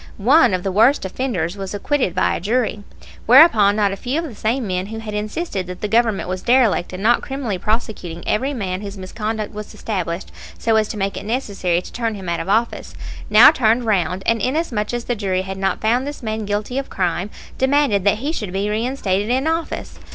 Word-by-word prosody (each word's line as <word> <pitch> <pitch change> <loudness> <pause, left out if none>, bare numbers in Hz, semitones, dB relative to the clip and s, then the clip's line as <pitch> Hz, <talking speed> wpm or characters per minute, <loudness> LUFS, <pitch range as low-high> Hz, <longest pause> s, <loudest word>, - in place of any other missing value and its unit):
One 250 - +4
of 180 - -4
the 195 - -1
worst 225 +6 +4
offenders 190 -5 -2
was 195 0 -5
acquitted 225 - 0
by 185 - +2
a - - -2
jury; 220 +2 -1 0.5
whereupon 230 -6 +7
not 205 -2 +2
a - - -3
few 250 +8 -3
of 330 - -1
the 280 - -8
same 230 +4 -1
men 185 -1 -2
who 225 +1 -6
had 220 -1 -6
insisted 210 - -3
that 180 0 -8
the 210 - -1
Government 225 -1 +1
was 185 0 -3
derelict 240 -7 +2
in 185 +2 -6
not 240 +2 +4
criminally 260 -8 -4
prosecuting 210 -6 -3
every 260 +7 0
man 195 -7 -3
whose 200 -1 -7
misconduct 215 +3 -4
was 210 0 -8
established 185 -4 -4 0.3
so 225 -1 +1
as 215 -1 +3
to 215 - -6
make 195 0 -2
it - - -5
necessary 200 -7 -1
to - - -12
turn 230 -2 -2
him 190 -3 -8
out 170 0 -1
of - - -5
office, 225 +3 0 0.3
now 215 +6 +9
turned 240 -4 +2
round 185 -3 0
and, 230 -1 +1
inasmuch 255 -5 -1
as 240 -1 -3
the 245 - -1
jury 190 -3 -1
had 190 0 -6
not 195 0 -1
found 245 +5 +1
this 290 -3 -7
man 220 -1 -3
guilty 210 +6 -2
of 275 - -6
crime, 180 +1 -1 0.3
demanded 265 -7 +2
that 205 +1 +3
he 280 +7 -2
should 210 - -4
be 200 +2 -1
reinstated 215 -3 -1
in 260 +3 +1
office! 325 0 -3
215 Hz, 215 wpm, -20 LUFS, 195-245 Hz, 0.5 s, now